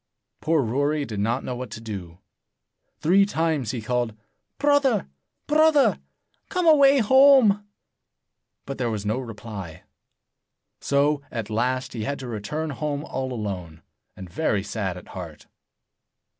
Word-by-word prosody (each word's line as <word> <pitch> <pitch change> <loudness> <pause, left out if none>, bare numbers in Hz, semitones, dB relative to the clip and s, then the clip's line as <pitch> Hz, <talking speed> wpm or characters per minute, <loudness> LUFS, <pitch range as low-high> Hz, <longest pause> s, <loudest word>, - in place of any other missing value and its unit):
Poor 160 -2 +2
Rory 145 +5 0
did 105 -5 -5
not 115 +6 0
know 125 - -4
what 125 -1 -6
to 115 - -8
do. 95 -7 -7 0.8
Three 190 +5 +5
times 160 - 0
he 120 -2 -4
called, 120 -2 -1 0.4
"Brother! 285 -6 +2 0.4
Brother! 305 -1 +4 0.5
Come 365 -2 -1
away 280 -3 +6
home!" 255 -4 +5 1.0
But 135 0 -6
there 120 -2 0
was 105 -2 -4
no 110 +5 0
reply. 105 -8 -8 1.0
So, 145 +1 +1
at 115 -3 -5
last, 125 +4 -1
he 115 -3 -4
had 140 +6 -2
to 130 - -7
return 135 +8 -4
home 145 +1 -3
all 130 0 -4
alone, 90 -8 -5 0.3
and 95 - -8
very 100 - -1
sad 100 -3 -3
at 90 - -12
heart. 85 -5 -9
130 Hz, 135 wpm, -24 LUFS, 105-165 Hz, 1.0 s, away